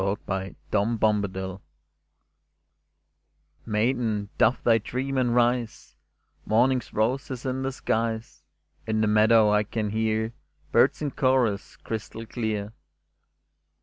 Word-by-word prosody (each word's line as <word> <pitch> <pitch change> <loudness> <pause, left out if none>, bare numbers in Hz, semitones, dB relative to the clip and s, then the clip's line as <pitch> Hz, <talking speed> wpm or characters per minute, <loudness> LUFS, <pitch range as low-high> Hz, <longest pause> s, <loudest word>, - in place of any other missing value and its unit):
68 95 0 -3 0.2
• 110 +2 +1
MADRIGAL 95 -3 0 2.1
Maiden, 110 -2 0
doff 125 - +3
thy 115 -1 +4
dream, 130 +5 -3
and 125 -2 +1
rise 120 -1 0
I - - -27
Morning's 125 +2 +2
rose 125 +7 0
is 130 -1 -6
in 130 0 -2
the 135 0 -1
skies; 110 - -2 0.5
In 110 -1 +1
the 110 - +2
meadow 110 0 +5
I 105 0 +4
can 105 0 -3
hear 110 +1 0 0.4
Birds - - +3
in 145 - -1
chorus 130 -7 +1
crystal 110 0 -6
clear. 110 -3 -3
110 Hz, 115 wpm, -26 LUFS, 105-125 Hz, 2.1 s, meadow